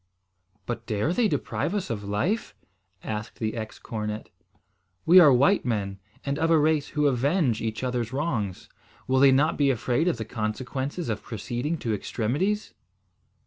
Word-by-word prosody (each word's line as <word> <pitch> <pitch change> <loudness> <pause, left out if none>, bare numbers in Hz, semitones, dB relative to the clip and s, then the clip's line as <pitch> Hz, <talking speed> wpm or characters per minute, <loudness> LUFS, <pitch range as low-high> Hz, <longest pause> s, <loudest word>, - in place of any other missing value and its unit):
"But 120 - -5
dare 110 +10 0
they 235 +2 +3
deprive 150 +1 -2
us 195 -11 -2
of 105 -3 -3
life?" 105 - -1 0.5
asked 105 0 -5
the 110 -1 -2
ex 110 -1 -6
cornet. 105 -1 -5 0.8
"We 180 +3 +8
are 155 -5 +8
white 140 +11 +4
men, 100 -5 -2 0.3
and 140 +1 -1
of 165 0 +2
a 165 - +5
race 150 -1 +2
who 150 - +3
avenge 140 - +2
each 110 +1 -3
other's 125 -2 -1
wrongs. 130 - -2 0.4
Will 130 0 +2
they 135 0 +7
not 145 +4 +2
be 140 -1 +4
afraid 130 +5 +1
of 175 - +1
the 110 - -4
consequences 130 +9 -3
of 110 -3 -2
proceeding 120 +8 -3
to 115 -7 -2
extremities?" 140 - -1
130 Hz, 160 wpm, -26 LUFS, 110-150 Hz, 0.8 s, We